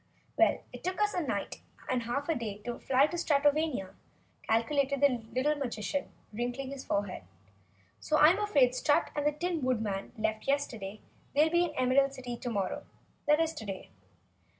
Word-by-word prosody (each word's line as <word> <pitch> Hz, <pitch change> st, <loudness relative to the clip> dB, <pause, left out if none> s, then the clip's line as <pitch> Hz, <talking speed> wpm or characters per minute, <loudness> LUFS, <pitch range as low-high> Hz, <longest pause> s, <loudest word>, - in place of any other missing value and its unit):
"Well, -, -, +3 dB
it -, -, -9 dB
took 370 Hz, +2 st, -2 dB
us 420 Hz, 0 st, +2 dB
a 355 Hz, -, 0 dB
night, 310 Hz, -, -3 dB, 0.3 s
and 255 Hz, -1 st, 0 dB
half 245 Hz, +5 st, -2 dB
a 330 Hz, -, +2 dB
day 225 Hz, -7 st, -4 dB
to 240 Hz, -1 st, -4 dB
fly 270 Hz, +1 st, +4 dB
to 345 Hz, +3 st, -4 dB
Stratovania," 290 Hz, -, +1 dB, 0.5 s
calculated 275 Hz, +5 st, +1 dB
the 255 Hz, -5 st, +3 dB
little 260 Hz, +5 st, +2 dB
Magician, 275 Hz, -1 st, -3 dB, 0.2 s
wrinkling 245 Hz, +4 st, -3 dB
his 275 Hz, -1 st, -6 dB
forehead. 200 Hz, -, -2 dB, 0.8 s
"So 305 Hz, -, +1 dB
I'm 330 Hz, +7 st, +6 dB
afraid 295 Hz, -12 st, +4 dB
if -, -, -13 dB
Strut 290 Hz, +3 st, +2 dB
and 290 Hz, 0 st, +1 dB
the -, -, +4 dB
Tin 335 Hz, +2 st, -2 dB
Woodman 220 Hz, -6 st, -1 dB
left 220 Hz, 0 st, -2 dB
yesterday, 225 Hz, -8 st, -2 dB, 0.3 s
they'll 305 Hz, +2 st, +4 dB
be 345 Hz, +1 st, +4 dB
in 320 Hz, -, -5 dB
the -, -, -5 dB
Emerald 270 Hz, +2 st, +3 dB
City 245 Hz, -2 st, -5 dB
tomorrow. 225 Hz, -6 st, -3 dB, 0.4 s
That 300 Hz, +1 st, +5 dB
is 325 Hz, 0 st, +1 dB
today." 200 Hz, -7 st, -7 dB
275 Hz, 175 wpm, -31 LUFS, 230-300 Hz, 0.8 s, I'm